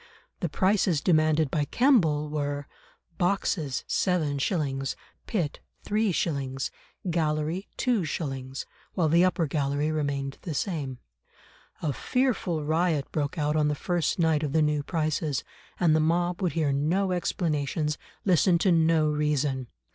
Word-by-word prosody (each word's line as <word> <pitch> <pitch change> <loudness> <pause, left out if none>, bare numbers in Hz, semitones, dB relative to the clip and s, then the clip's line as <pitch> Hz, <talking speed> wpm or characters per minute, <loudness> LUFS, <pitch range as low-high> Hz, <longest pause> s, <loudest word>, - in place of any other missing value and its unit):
The 175 - -1
prices 185 0 +2
demanded 155 -3 +3
by 150 -2 +1
Kemble 165 - +3
were: 145 -1 -3 0.5
boxes 175 -6 0
7s.; 145 -5 0 0.3
pit 175 -10 -1 0.3
3s.; 155 -11 0 0.4
gallery 160 +3 -1
2s.; 145 - -2 0.3
while 170 -4 +2
the 170 +3 +5
upper 180 -2 +2
gallery 145 +1 0
remained 140 -3 -2
the 165 -4 -5
same. 145 -8 -2 0.9
A 150 -3 0
fearful 220 - 0
riot 155 -1 +1
broke 145 +2 -2
out 150 0 +1
on 150 -1 +3
the 150 - 0
first 175 +1 0
night 160 -3 +2
of 150 -3 -2
the 160 -1 +4
new 150 -1 +1
prices, 155 -2 -1 0.4
and 165 -3 +4
the - - +4
mob 175 +3 +1
would 180 -3 0
hear 155 -4 +1
no 175 +8 +1
explanations, 150 -4 -1 0.3
listen 180 -1 +4
to 185 +2 +2
no 165 -2 +4
reason. 150 -3 0
155 Hz, 130 wpm, -27 LUFS, 145-175 Hz, 0.9 s, the